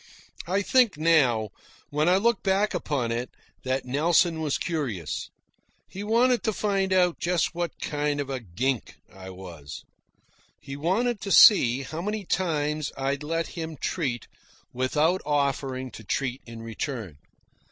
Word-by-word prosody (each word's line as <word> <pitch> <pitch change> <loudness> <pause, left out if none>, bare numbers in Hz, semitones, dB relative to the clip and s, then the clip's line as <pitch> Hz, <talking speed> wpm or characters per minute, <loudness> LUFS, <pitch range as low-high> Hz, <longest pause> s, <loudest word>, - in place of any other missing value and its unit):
I 195 +3 +1
think, 245 - +3
now, 135 -9 +3 0.4
when 150 +3 +2
I 185 - +5
look 235 +2 +2
back 200 +2 +1
upon 140 -9 -1
it, 120 +2 -2 0.3
that 130 0 -1
Nelson 160 +5 +2
was 150 -3 0
curious. 130 - -3 0.6
He 195 - -7
wanted 235 +2 +3
to 220 - 0
find 195 -2 0
out 180 -2 +3
just 175 0 0
what 175 -2 -4
kind 145 -1 -1
of 140 - -2
a 135 -1 -3
gink 120 +5 -2 0.2
I 95 0 -10
was. 90 -6 -9 0.8
He 140 - -8
wanted 200 - 0
to 195 - -4
see 135 - +7
how 155 +5 -5
many 210 +1 -3
times 150 -5 -1
I'd 135 +1 -1
let 165 +2 -2
him 160 -2 -6
treat 130 -9 -2 0.5
without 150 +8 +1
offering 135 -3 -1
to 110 - -11
treat 130 +5 -2
in 115 -1 -9
return. 115 - -5
150 Hz, 145 wpm, -26 LUFS, 130-180 Hz, 0.8 s, see